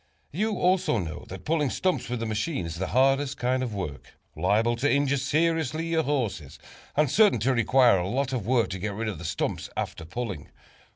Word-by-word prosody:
You 210 +5 -1
also 180 -6 +2
know 85 -6 -5
that 95 0 -9
pulling 150 -3 +1
stumps 185 -5 -1
with 120 -2 -2
a - - -1
machine 110 - -2
is 85 0 -5
the 95 +1 -2
hardest 135 +3 +2
kind 130 +1 0
of 120 -5 -3
work 85 -8 -6 0.2
liable 115 +3 +2
to 140 +5 +1
injure 140 0 +2
seriously 160 +2 0
your 165 -1 +2
horses, 125 - -2 0.4
and 150 0 +4
certain 205 - +4
to 130 +4 +2
require 120 -3 +4
a 90 - -2
lot 135 +5 -1
of 115 -6 -3
work 120 -2 +2
to 95 - -4
get 100 +1 -3
rid 115 +2 -3
of 100 -7 -4
the - - -8
stump - - -2 0.2
after - - -3
pulling. 95 -2 -5
125 Hz, 205 wpm, -26 LUFS, 105-145 Hz, 0.4 s, and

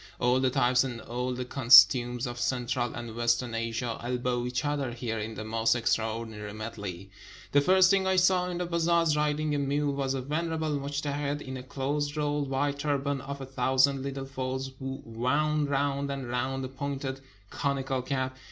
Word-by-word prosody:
All 125 +1 +3
the 130 0 +2
types 125 -1 +3
and 125 -3 -4
all 125 +2 -3
the 125 0 -3
cos 125 -1 +9
tumes 120 0 -3
of 120 -1 -5
central 120 -1 -1
and 120 -2 -6
western 120 0 +1
Asia 115 +1 -2
elbow 125 0 -1
each 125 +3 -2
other 145 -3 -1
here 115 -2 -3
in 110 +1 -5
the 110 - -5
most 115 +1 +1
extraordinary 110 -2 -2
medley. 100 -4 -7 0.4
The 145 - +5
first 185 +4 +5
thing 195 -1 +2
I 190 - +3
saw 180 0 +3
in 175 - -3
the 180 - -1
bazaars, 170 -2 +2
riding 150 0 0
a 145 - +1
mule, 140 +1 0
was 135 -1 -1
a 130 - -2
venerable 160 +2 -2
mujtehid, 145 +1 -3
in 130 0 -6
a 130 - -6
close 145 +3 -2
rolled 145 -2 -1
white 140 +1 -1
turban 140 -1 -1
of 140 +1 -6
a - - -5
thousand 130 +1 +2
Httle 135 -1 -4
folds, 130 0 -4
wound 135 +3 -1
round 140 0 0
and 135 -2 -4
round 130 +2 -2
a - - -3
pointed 135 0 -4 0.3
conical 135 -2 -1
cap. 130 0 -2
135 Hz, 180 wpm, -28 LUFS, 120-145 Hz, 0.4 s, cos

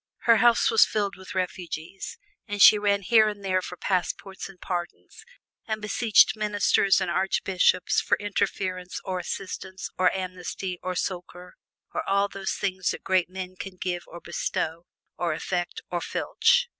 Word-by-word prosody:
Her 230 -1 +5
house 240 -1 +4
was 225 - +7
filled 205 -2 -1
with 190 0 -10
refugees, 180 - -4 0.3
and 205 -1 -4
she 210 +1 +9
ran 200 -1 +1
here 215 +4 +5
and 205 -1 -8
there 185 -1 +1
for 180 0 -8
passports 190 +2 -2
and 190 -2 -15
pardons, 175 -1 -5 0.4
and 220 -1 -2
beseeched 215 +1 +4
ministers 205 -2 +3
and 185 -2 -1
archbishops 185 0 +2
for - - +1
interference 185 -3 -2
or 185 -1 -2
assistance 190 0 -6
or 185 0 +5
amnesty 185 -1 -5
or 185 0 -3
succor 180 0 -5 0.4
and - - -1
all 200 +1 +3
those 195 -1 -4
things 185 -2 -1
that - - -4
great 185 -2 +2
men 185 0 -6
can 190 0 -7
give 175 -1 -2
or 175 - -10
bestow 170 -1 -3 0.3
or 170 -2 0
effect 175 +2 -3
or 175 -1 -1
filch. 485 - +2
190 Hz, 155 wpm, -26 LUFS, 180-200 Hz, 0.4 s, she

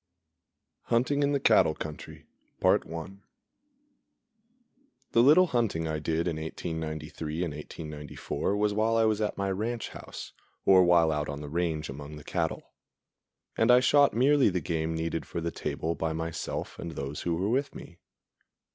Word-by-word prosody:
_ - - -27
Hunting 130 +5 +2
in 140 0 +2
the 140 - +1
Cattle 110 - +4
Country 75 -1 -8 0.4
The - - +4 2.4
little 155 +9 +7
hunting 115 - 0
I 80 -1 -2
did 80 +3 -1
in 85 -2 -1
1893 80 0 -4
and 85 -4 -3
1894 75 +5 -4
was 105 0 +1
while 110 +2 +2
I 115 - +4
was 110 -1 +1
at 105 - -1
my 100 0 -1
ranch 115 +5 -3
house, - - -9 0.3
or 95 -1 +7
while 85 -2 +4
out 75 -1 -2
on 70 0 -5
the 75 - -7
range 80 -1 -1
among 70 +2 -8
the 75 - -10
cattle; - - -3 0.8
and 115 - +2
I 125 0 +8
shot 140 +1 +4
merely 135 +2 +4
the 90 -1 -1
game 80 0 -2
needed 80 0 -3
for - - -4
the 85 0 -2
table 80 0 -3
by 80 -1 -2
myself 80 0 -4
and 85 -1 -5
those 70 0 -5
who 85 -1 -1
were 95 +5 -1
with 135 +4 0
me. 85 +1 -11
85 Hz, 160 wpm, -28 LUFS, 80-110 Hz, 2.4 s, I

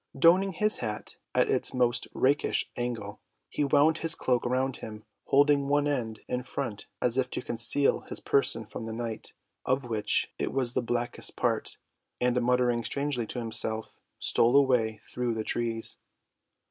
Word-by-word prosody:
Donning 185 +6 +5
his 215 0 +2
hat 105 -3 -5 0.2
at - - +4
its - - 0
most 120 -1 +1
rakish 140 +3 +1
angle, 115 -4 -4 0.3
he - - -1
wound 145 +3 +4
his 165 -1 +3
cloak 125 -2 0
around 130 +1 0
him, 110 -1 -9 0.2
holding 140 0 +4
one 145 +1 +2
end 120 -6 -2
in 125 0 -2
front 125 -5 -5
as 125 +1 +1
if 125 -1 0
to - - -3
conceal 120 +5 +2
his - - -1
person 125 -5 +2
from 110 +2 -7
the 110 - -4
night, 115 -1 -5 0.3
of 130 +2 +1
which 110 -3 0
it - - -1
was 130 -3 0
the 130 - +1
blackest 120 0 -2
part, - - -1 0.4
and 125 0 +2
muttering 120 -1 +2
strangely 140 -4 -2
to - - -6
himself, 110 -1 -1 0.2
stole 120 +3 +2
away 120 -6 +3
through 120 -2 -2
the 110 - -2
trees. 115 0 -2
125 Hz, 160 wpm, -28 LUFS, 115-140 Hz, 0.4 s, Donning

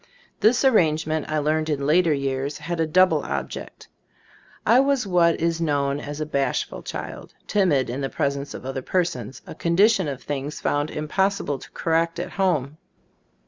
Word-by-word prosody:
This 235 +6 +3
arrangement, 160 - +2
I 155 - 0
learned 155 +1 0
in 140 -2 -1
later 165 +3 +4
years, 140 0 -1
had 170 -1 -4
a 160 - +1
double 185 +4 +4
object. - - -6 0.8
I 240 - +6
was 275 -3 +2
what 175 -3 +3
is 165 0 0
known 145 -3 0
as 145 0 -6
a 155 - -1
bashful 140 -2 -1
child, - - -7
timid 165 - +2
in 125 +4 -4
the 135 - -2
presence 140 -2 -2
of - - -9
other 135 0 -3
persons, 135 - -2
a - - -8
condition 190 +2 +3
of 135 -2 -5
things 145 +1 -4
found 145 +1 0
impossible 155 -1 -1
to - - -12
correct 165 0 0
at 175 - -4
home. 155 -7 0
155 Hz, 165 wpm, -24 LUFS, 140-180 Hz, 0.8 s, I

